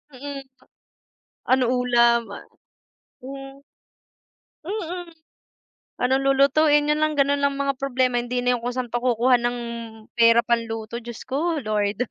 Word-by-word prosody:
Mm. 275 +1 -7 1.0
Ano 260 -1 +4 0.2
ulam? 235 -2 +3 0.9
Hmm. 270 +1 -9 1.1
Mm. 355 -3 -5 0.9
Ano 250 +1 +1
lulutuin? 290 +2 +3
Yun 300 +1 +1
lang 305 -1 0
ganun 280 +1 +2
lang 280 0 +1
mga 275 0 0
problema, 255 -2 0
hindi 245 +1 -3
na 250 0 +2
yung 235 - -8
kung 245 - -1
saan 250 -1 -3
pa 240 - 0
kukuha 250 +1 +3
ng 240 0 -1 0.6
pera 230 0 +6
pang 235 -1 +1
luto, 225 +1 -6
Diyos 235 0 -9
ko 310 +4 -1
Lord. 215 +1 -1
255 Hz, 135 wpm, -23 LUFS, 240-280 Hz, 1.1 s, pera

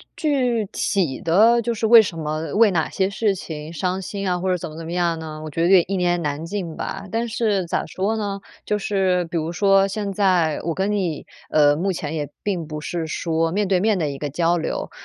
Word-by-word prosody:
具 250 -8 +1
体 180 -10 -1
的 220 +8 +4
就 235 0 -2
是 220 - -1
为 230 0 +9
什 180 -5 -4
么 155 +2 -3
为 215 -2 +5
哪 160 -3 0
些 190 -1 0
事 200 0 0
情 155 -2 -7
伤 185 +3 -2
心 200 0 -4
啊， 180 -1 0
或 190 +1 -1
者 180 - +2
怎 175 - -6
么 155 - -10
怎 165 - -7
么 165 - -6
样 170 -2 0
呢， 155 -1 -7
我 155 - -6
觉 165 - -2
得 170 - +3
有 - - +6
点 175 - +5
一 195 - -2
言 175 0 +2
难 145 +2 -2
尽 170 -2 -4
吧。 195 +1 -5
但 230 +1 -1
是 210 -5 0
咋 - - -1
说 210 +4 -2
呢， 200 -2 -3 0.2
就 210 0 0
是 190 -3 +1
比 170 +1 -4
如 160 +1 -2
说 195 +1 +4
现 200 0 -3
在 180 -5 +2
我 165 0 -1
跟 195 +4 -1
你， 180 -7 -1 0.3
呃， 145 -1 +5
目 190 +4 -1
前 160 -1 -4
也 145 -2 -2
并 185 -6 -2
不 150 0 -6
是 165 0 -3
说 165 +1 -1
面 205 +1 0
对 185 -2 +2
面 210 -1 +2
的 150 -3 0
一 140 - -5
个 145 - -3
交 170 +2 +1
流。 160 - -3
180 Hz, 260 characters per minute, -22 LUFS, 160-200 Hz, 0.3 s, 为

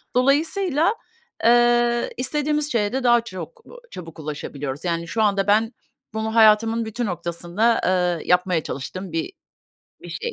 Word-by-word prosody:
Dolayısıyla, 315 - +2 0.5
eee, 240 0 +3
istediğimiz 295 +3 -1
şeye 210 -3 0
de 265 0 -1
daha 240 -1 +4
çok, 235 - -9
b - - -15 0.2
çabuk 165 -2 -10
ulaşabiliyoruz. 145 -1 -6
Yani 170 -1 -2
şu 220 +6 -2
anda 200 -1 +1
ben 220 +3 +2 0.4
bunu 220 0 -3
hayatımın 225 +1 +4
bütün 235 +2 -3
noktasında, 180 +4 -1
eee, 180 -2 0
yapmaya 180 -2 +2
çalıştığım 185 +7 -6
bir 165 - -3 0.7
bir - - -10
şey. 475 0 -4
220 Hz, 140 wpm, -22 LUFS, 180-245 Hz, 0.7 s, daha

